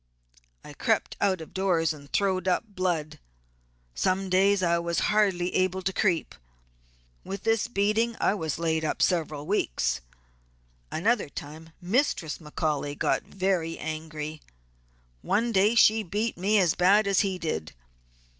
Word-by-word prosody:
I -, -, -11 dB
crept -, -, 0 dB
out 190 Hz, -4 st, +1 dB
of 160 Hz, -, -11 dB
doors 175 Hz, -4 st, +1 dB
and 140 Hz, -2 st, -14 dB
throwed 190 Hz, -2 st, 0 dB
up 180 Hz, -, +2 dB
blood; 180 Hz, -6 st, -2 dB, 0.7 s
some 185 Hz, -, 0 dB
days 195 Hz, +1 st, +3 dB
I 170 Hz, -1 st, +2 dB
was 170 Hz, 0 st, -2 dB, 0.2 s
hardly 190 Hz, -4 st, +2 dB
able 185 Hz, 0 st, 0 dB
to 190 Hz, +1 st, -1 dB
creep. 180 Hz, -6 st, 0 dB, 0.9 s
With 195 Hz, +1 st, -6 dB
this 225 Hz, 0 st, +1 dB
beating 225 Hz, +1 st, +1 dB
I -, -, +2 dB
was 160 Hz, -7 st, -3 dB
laid 160 Hz, -1 st, 0 dB
up 155 Hz, -, 0 dB
several 155 Hz, -5 st, 0 dB
weeks. 155 Hz, -, 0 dB, 0.9 s
Another 220 Hz, +1 st, +1 dB
time 155 Hz, +3 st, -9 dB
Mistress 190 Hz, -, 0 dB
McCaully 150 Hz, -2 st, -3 dB
got -, -, +1 dB
very 185 Hz, -4 st, -1 dB
angry. 155 Hz, -1 st, -6 dB, 0.8 s
One 230 Hz, -, 0 dB
day 210 Hz, +2 st, +3 dB
she 220 Hz, -1 st, +5 dB
beat 210 Hz, +4 st, -2 dB
me 200 Hz, +5 st, +2 dB
as 180 Hz, -5 st, +3 dB
bad 195 Hz, +4 st, +4 dB
as 195 Hz, -2 st, +2 dB
he 195 Hz, -2 st, 0 dB
did. 80 Hz, -, -4 dB
185 Hz, 140 wpm, -27 LUFS, 160-200 Hz, 0.9 s, she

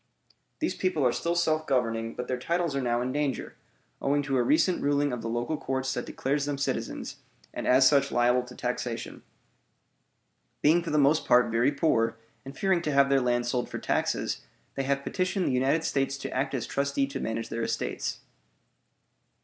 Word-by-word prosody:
These 320 Hz, -, -1 dB
people 180 Hz, -7 st, 0 dB
are 125 Hz, -, +4 dB
still 170 Hz, +7 st, -1 dB
self 155 Hz, -2 st, +1 dB
governing, 115 Hz, -4 st, 0 dB
but 125 Hz, -, -5 dB
their 125 Hz, -1 st, -2 dB
titles 170 Hz, +2 st, -1 dB
are 140 Hz, -, 0 dB
now 120 Hz, -1 st, 0 dB
in 125 Hz, -, -2 dB
danger, 145 Hz, -2 st, -2 dB, 0.5 s
owing 145 Hz, +1 st, +1 dB
to 135 Hz, -1 st, -1 dB
a -, -, +3 dB
recent 160 Hz, +8 st, +2 dB
ruling 145 Hz, -1 st, +1 dB
of 120 Hz, -, -4 dB
the 115 Hz, -, -4 dB
local 120 Hz, +7 st, -1 dB
courts 130 Hz, -1 st, -2 dB
that -, -, -4 dB
declares 140 Hz, +2 st, -1 dB
them 145 Hz, -1 st, -2 dB
citizens, 140 Hz, -, -3 dB, 0.4 s
and -, -, -4 dB
as 130 Hz, +1 st, +6 dB
such 140 Hz, -1 st, +3 dB
liable 120 Hz, +1 st, +3 dB
to 125 Hz, 0 st, -12 dB
taxation. 125 Hz, -1 st, -4 dB, 1.4 s
Being 160 Hz, +4 st, +5 dB
for 170 Hz, -, -5 dB
the 150 Hz, -, +1 dB
most 145 Hz, +2 st, +4 dB
part 125 Hz, -1 st, +5 dB
very 120 Hz, +5 st, +3 dB
poor 115 Hz, -7 st, +1 dB, 0.3 s
and 135 Hz, +1 st, -10 dB
fearing 190 Hz, -3 st, +2 dB
to 155 Hz, -, -2 dB
have 140 Hz, -1 st, +4 dB
their 135 Hz, -1 st, +3 dB
land 120 Hz, -1 st, +1 dB
sold 120 Hz, 0 st, -1 dB
for -, -, -5 dB
taxes, -, -, -1 dB, 0.3 s
they 135 Hz, -, -2 dB
have 140 Hz, 0 st, 0 dB
petitioned 185 Hz, +2 st, -1 dB
the -, -, +1 dB
United 135 Hz, +5 st, +2 dB
States 135 Hz, -2 st, 0 dB
to 140 Hz, -, -6 dB
act 135 Hz, +1 st, -1 dB
as 125 Hz, -, -2 dB
trustee 140 Hz, 0 st, 0 dB
to 135 Hz, 0 st, -6 dB
manage 115 Hz, -1 st, -3 dB
their 115 Hz, -, -3 dB
estates. -, -, -3 dB
135 Hz, 190 wpm, -28 LUFS, 125-145 Hz, 1.4 s, as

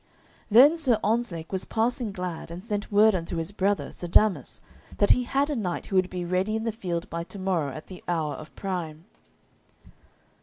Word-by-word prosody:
Then 270 Hz, +9 st, +7 dB
Sir 260 Hz, -8 st, +3 dB
Ontzlake 205 Hz, -8 st, -1 dB
was 190 Hz, -1 st, 0 dB
passing 230 Hz, 0 st, -1 dB
glad, 180 Hz, -4 st, -5 dB
and 170 Hz, +2 st, -8 dB
sent 210 Hz, -2 st, -3 dB
word 210 Hz, +1 st, +6 dB
unto 170 Hz, -1 st, -3 dB
his 165 Hz, +3 st, -2 dB
brother, 200 Hz, 0 st, 0 dB
Sir 175 Hz, -, -6 dB
Damas, 175 Hz, -, +3 dB, 0.4 s
that 205 Hz, -, +4 dB
he 250 Hz, -, +3 dB
had 280 Hz, +4 st, +1 dB
a -, -, -1 dB
knight 185 Hz, -7 st, -3 dB
who 195 Hz, -, -4 dB
would 185 Hz, -1 st, +3 dB
be 180 Hz, -1 st, -4 dB
ready 185 Hz, +5 st, 0 dB
in 220 Hz, -, -2 dB
the 225 Hz, -, 0 dB
field 180 Hz, -6 st, -4 dB
by 170 Hz, 0 st, -3 dB
to 200 Hz, -, -11 dB
morrow 180 Hz, -7 st, -1 dB
at 155 Hz, +4 st, -8 dB
the 185 Hz, -2 st, -11 dB
hour 160 Hz, -4 st, 0 dB
of 155 Hz, 0 st, -9 dB
prime. 170 Hz, -4 st, -4 dB
190 Hz, 195 wpm, -26 LUFS, 170-220 Hz, 0.4 s, Then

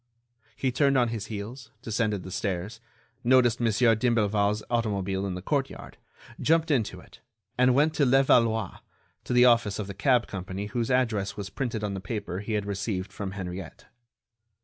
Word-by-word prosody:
He 130 Hz, +2 st, -1 dB
turned 140 Hz, +1 st, +3 dB
on 120 Hz, -2 st, +3 dB
his 110 Hz, -2 st, -4 dB
heels, 115 Hz, +4 st, -7 dB
descended 105 Hz, -3 st, -1 dB
the 95 Hz, -, -8 dB
stairs, 100 Hz, +4 st, -3 dB, 0.4 s
noticed 120 Hz, -1 st, +4 dB
Mon. 120 Hz, -1 st, +2 dB
d'Imblevalle's 105 Hz, -2 st, +2 dB
automobile 100 Hz, -4 st, -1 dB
in 95 Hz, -, -3 dB
the 90 Hz, -, -7 dB
courtyard, 135 Hz, +3 st, -3 dB, 0.4 s
jumped 165 Hz, 0 st, +2 dB
into 120 Hz, -7 st, 0 dB
it, -, -, -17 dB, 0.4 s
and 125 Hz, 0 st, +4 dB
went 150 Hz, +3 st, +3 dB
to 150 Hz, -, +1 dB
Levallois, 120 Hz, -4 st, +3 dB, 0.5 s
to -, -, -5 dB
the 125 Hz, 0 st, +6 dB
office 115 Hz, -4 st, +3 dB
of 105 Hz, -, -3 dB
the 100 Hz, -, -7 dB
cab 120 Hz, +5 st, +2 dB
company 95 Hz, +1 st, -5 dB
whose 115 Hz, +2 st, -2 dB
address 115 Hz, -6 st, 0 dB
was 100 Hz, -1 st, -6 dB
printed 115 Hz, -5 st, -3 dB
on 105 Hz, -1 st, -2 dB
the 95 Hz, -, -4 dB
paper 100 Hz, -3 st, -4 dB
he 105 Hz, +2 st, -4 dB
had 105 Hz, -1 st, -1 dB
received 100 Hz, -1 st, -3 dB
from 100 Hz, -2 st, -5 dB
Henriette. 90 Hz, -3 st, -7 dB
110 Hz, 170 wpm, -27 LUFS, 100-125 Hz, 0.5 s, the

